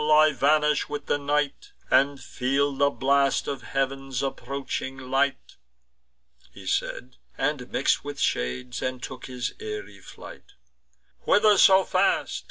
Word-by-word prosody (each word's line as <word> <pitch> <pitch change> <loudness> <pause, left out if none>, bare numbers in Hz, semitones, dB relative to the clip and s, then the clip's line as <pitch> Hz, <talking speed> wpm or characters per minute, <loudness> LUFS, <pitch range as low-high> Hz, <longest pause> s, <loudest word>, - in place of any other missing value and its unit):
I 155 0 +6
vanish 150 +2 +2
with 145 0 -5
the 145 - 0
night, 145 - -2 0.2
And 140 0 +3
feel 135 +3 -1
the 140 +1 +3
blast 140 0 +1
of 140 -3 -3
heav'n's 135 +1 -2
approaching 135 0 -4
light." 135 +1 -1 0.9
He - - -13
said, 65 0 -3 0.2
and - - -2
mix'd - - +2
with - - -7
shades, 120 - -2
and 130 -1 -3
took 130 -1 -7
his 125 -2 -4
airy 105 -2 -7
flight. - - -13 0.7
"Whither 210 0 +5
so 190 -1 +7
fast?" 185 +1 +1
135 Hz, 130 wpm, -25 LUFS, 130-145 Hz, 0.9 s, so